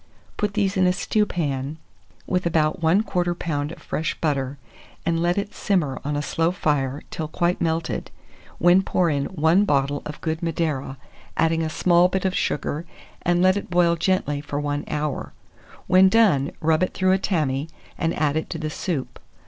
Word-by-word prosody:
Put 205 -1 -2
these 200 -1 +1
in 185 -1 +4
a 180 - +3
stewpan, 155 -9 -1 0.5
with 180 -1 0
about 155 -1 +1
1/4 170 +6 +3 0.3
lb. 150 -3 -2
of - - -10
fresh 160 +1 -3
butter, 140 -3 -1 0.5
and 165 0 +1
let 175 +2 +1
it 200 0 -2
simmer 165 -10 0
on 145 +1 -2
a 145 - -1
slow 165 +2 +1
fire 145 -6 -1
till 155 - -3
quite 175 +3 0
melted, 165 0 -1 0.5
when 175 +2 +5
pour 180 -3 +1
in 140 -1 0
1 170 +3 +3
bottle 140 -3 +1
of 150 - -7
good 160 0 -2
Madeira, 155 -5 -2 0.4
adding 165 0 +2
a 160 - -1
small 175 +2 +4
bit 190 +1 -2
of 190 - +1
sugar, 150 +2 -1 0.4
and 175 +1 +2
let 185 0 +5
it 200 - -4
boil 175 -1 +3
gently 160 -5 0
for 145 -1 -4
1 145 0 -2
hour. 150 -2 -3 0.5
When 190 +1 +6
done, 190 -11 +4
rub 160 0 +2
it 185 - 0
through 185 0 +2
a 190 - +3
tammy, 150 -6 -1 0.3
and 165 0 -1
add 150 -1 +1
it 160 - -2
to - - -4
the 155 -1 -4
soup. 150 -5 -4
165 Hz, 180 wpm, -23 LUFS, 145-180 Hz, 0.5 s, When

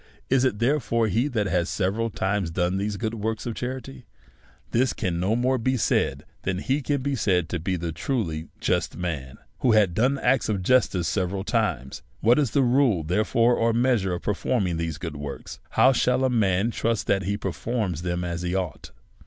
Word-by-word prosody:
Is 130 -1 +4
it, 130 -6 +1
therefore, 115 -2 +1
he 115 +8 +1
that 115 -7 -1
has 90 -2 0
several 105 +4 0
times 95 -3 -1
done 90 +2 0
these 100 +1 -2
works 110 0 -3
of 120 - -2
charity? 125 - -6 0.6
This 125 +2 +2
can 85 -4 -2
no 95 +5 +1
more 130 +2 +1
be 130 +3 +1
said, - - 0 0.2
than 95 -1 -2
he 135 +9 0
can 140 -1 -1
be 140 0 0
called 90 -8 +1
a 85 0 -2
truly 80 - -2
just - - 0
man 75 -8 -4 0.2
who 120 - +3
had 105 -5 +4
done 130 +8 +2
acts 135 -3 +1
of 100 -3 -1
justice 95 -7 +2
several 95 +1 -1
times. 65 -8 -1 0.2
What 120 +6 +4
is 140 -5 +2
the 135 +5 +2
rule, 120 - +3
therefore, 110 +7 +2
or 115 0 +2
measure 115 -6 +2
of - - -7
performing 100 -4 0
these 80 -2 -3
good 80 -2 -6
works? 70 -1 -7
How 130 - +5
shall 125 0 +2
a 130 - +2
man 105 -1 +2
trust 115 -1 -1
that 95 -2 +1
he 100 +1 -1
performs 105 -7 -2
them 90 0 -2
as 85 -1 -3
he 90 +1 -2
ought 90 -5 -3
105 Hz, 185 wpm, -25 LUFS, 90-120 Hz, 0.6 s, How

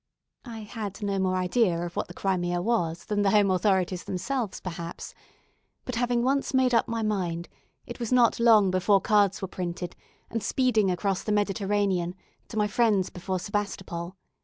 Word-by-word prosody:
I 230 -3 -7
had 210 -2 -6
no 200 -1 0
more 185 -1 +1
idea 185 -1 +2
of 175 - -7
what - - -2
the 175 - -11
Crimea 175 -2 0
was 175 -5 -1
than 210 -1 0
the 200 - +3
home 205 -1 +4
authorities 185 -1 +1
themselves 210 +3 -3
perhaps, 170 -2 -7 0.7
but 255 - -4
having 240 0 +1
once 275 +1 0
made 260 -1 +3
up 230 - +3
my 230 -1 -2
mind, 175 -5 -2 0.4
it - - -8
was 235 -1 -3
not 245 -3 +4
long 220 -5 +5
before 195 +2 +3
cards 200 -2 +2
were - - -1
printed 175 -1 -5 0.4
and 225 - -2
speeding 225 -6 +2
across 190 +1 0
the 215 - -3
Mediterranean 200 -3 0 0.3
to 220 - -7
my 210 - +3
friends 210 -3 +2
before 185 +1 -3
Sebastopol. 185 -2 -4
200 Hz, 170 wpm, -27 LUFS, 185-225 Hz, 0.7 s, long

